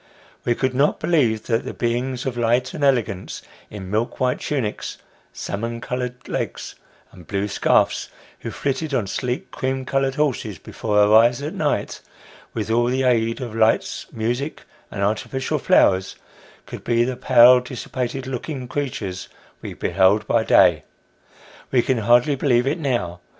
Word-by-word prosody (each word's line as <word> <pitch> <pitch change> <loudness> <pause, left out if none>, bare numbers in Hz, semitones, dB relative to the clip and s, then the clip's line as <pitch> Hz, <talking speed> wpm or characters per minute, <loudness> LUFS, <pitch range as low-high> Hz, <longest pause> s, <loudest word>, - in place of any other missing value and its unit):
We 120 - +2
could 130 +1 -1
not 140 +4 +2
believe 120 -10 +1
that 115 -1 0
the - - -7
beings 125 +2 -2
of 130 -2 -2
light 120 +2 +1
and 150 - -4
elegance, 115 -9 0 0.3
in 95 -3 -8
milk 110 +3 -1
white 125 -1 +1
tunics, 130 -8 -3 0.3
salmon 115 +3 -4
coloured 125 +1 -5
legs, - - -4 0.4
and 90 -4 -15
blue 100 +1 -1
scarfs, 100 - +1 0.3
who - - -6
flitted 140 +1 -2
on 115 - 0
sleek 125 +5 -3
cream 130 0 -3
coloured 135 0 0
horses 130 - -1
before 105 +5 -3
our 105 0 +5
eyes 120 +4 +5
at 150 - -4
night, - - -2 0.5
with 110 -1 -2
all 120 +1 +3
the 130 +2 0
aid 115 -1 +1
of 120 -4 -5
lights, 110 0 +1
music, 120 +7 -3 0.3
and 100 - -4
artificial 110 +6 -1
flowers, 95 0 +3 0.5
could - - -9
be 120 0 +2
the 125 +1 -2
pale, 125 0 +6
dissipated 125 +1 -5
looking 130 +1 -5
creatures 110 -10 -4 0.3
we - - -7
beheld 95 +4 +2
by 115 +1 +2
day. - - +4 0.9
Wo 130 - +3
can 130 -4 0
hardly 120 +6 +4
believe 130 -3 +2
it 150 +6 -1
now. 120 - -2
120 Hz, 155 wpm, -22 LUFS, 110-130 Hz, 0.9 s, pale